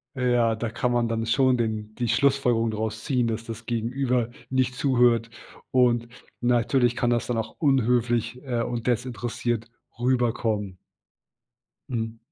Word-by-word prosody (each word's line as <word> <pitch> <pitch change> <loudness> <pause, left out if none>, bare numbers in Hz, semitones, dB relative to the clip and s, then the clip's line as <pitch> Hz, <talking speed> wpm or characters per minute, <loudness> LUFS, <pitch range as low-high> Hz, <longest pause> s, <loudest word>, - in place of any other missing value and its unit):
Ja, 120 -3 +2
da 115 +1 -3
kann 125 +2 -1
man 120 -1 +2
dann 115 0 -1
schon 130 +2 +3
den 110 -2 -3
die 120 -1 -2
Schlussfolgerung 125 -2 +2
daraus 110 +1 -4
ziehen, 125 -5 +1
dass 115 0 -3
das 115 0 -8
Gegenüber 120 +1 0 0.2
nicht 130 -1 +1
zuhört 120 -3 +3 0.4
und 120 -2 +3 0.3
natürlich 120 0 +2
kann 120 - +1
das 120 -1 0
dann 120 - -1
auch 110 - -4
unhöflich, 125 -3 +1
äh, 125 -4 -1
und 120 0 -3
desinteressiert 120 -1 -2 0.3
rüberkommen. 115 -5 0 1.1
Mhm. 115 -2 -3
120 Hz, 135 wpm, -25 LUFS, 115-125 Hz, 1.1 s, schon